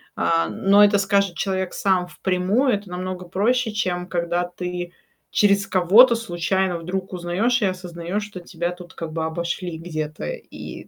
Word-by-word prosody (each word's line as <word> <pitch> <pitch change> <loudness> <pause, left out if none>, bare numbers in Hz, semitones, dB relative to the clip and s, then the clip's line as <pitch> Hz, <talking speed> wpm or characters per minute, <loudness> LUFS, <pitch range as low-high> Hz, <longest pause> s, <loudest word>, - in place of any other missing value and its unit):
а, 165 0 +2
но 200 +1 +4
это 205 0 +5
скажет 200 -2 +1
человек 190 -2 -2
сам 185 -2 +1
впрямую, 190 +9 +1
это 200 -2 -3
намного 180 0 -5
проще, 220 +5 +1
чем 180 -4 -2
когда 175 0 -1
ты 180 0 -5 0.4
через 200 -1 +3
кого-то, 200 +7 +6
случайно, 190 -3 -1
вдруг 185 +3 -4
узнаёшь 185 +8 0
и - - +3
осознаешь, 180 +1 -3
что 205 -3 -8
тебя, 175 0 -4
тут 175 -1 -11
как 165 -1 -6
бы 160 0 -2
обошли 170 +1 -3
где-то, 155 -2 -5
и - - -8
185 Hz, 155 wpm, -22 LUFS, 175-200 Hz, 0.4 s, кого-то